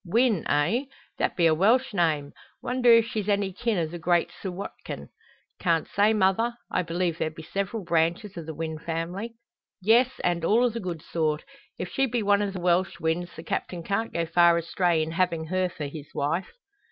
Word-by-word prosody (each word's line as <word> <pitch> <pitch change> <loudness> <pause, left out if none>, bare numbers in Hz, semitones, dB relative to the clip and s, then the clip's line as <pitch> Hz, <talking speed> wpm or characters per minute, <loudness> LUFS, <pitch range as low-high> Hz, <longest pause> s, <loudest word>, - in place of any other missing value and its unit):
"Wynn, 220 0 +2
eh? 175 - +2 0.3
That - - 0
be 170 - +4
a 160 - +5
Welsh 225 +10 +3
name. 155 -6 +1 0.3
Wonder 250 -1 +3
if 230 -1 +7
she's 215 -3 -3
any 200 -2 +1
kin 225 +2 -1
o' 170 - +1
the 170 +2 -7
great 170 0 +2
Sir 190 - -6
Watkin." 185 +2 -7 0.5
"Can't 165 -3 +1
say, 205 +2 +3
mother. 220 +3 +2 0.2
I - - +1
believe 170 -1 -1
there 160 - 0
be 160 +1 -11
several 200 +5 -3
branches 170 +4 0
o' 170 - -5
the 160 0 -7
Wynn 160 0 -4
family." 175 +8 -4 0.4
"Yes, 230 +6 +5
and 175 -1 +1
all 220 +8 +4
o' 245 - +4
the 230 0 -5
good 175 -6 -5
sort. 155 -2 -1 0.3
If 180 - -4
she 270 0 +1
be 240 -2 -1
one 200 0 +3
o' 205 - 0
the 190 -1 -6
Welsh 180 +1 +1
Wynns, 170 +2 -1
the 160 - -8
Captain 170 0 -3
can't 210 +5 -1
go 170 0 -1
far 170 +1 +5
astray 170 -1 +1
in 160 - -4
having 170 -2 0
her 185 +2 0
for 155 -4 -6
his 145 0 -7
wife." 160 +6 -1
180 Hz, 200 wpm, -26 LUFS, 165-210 Hz, 0.5 s, if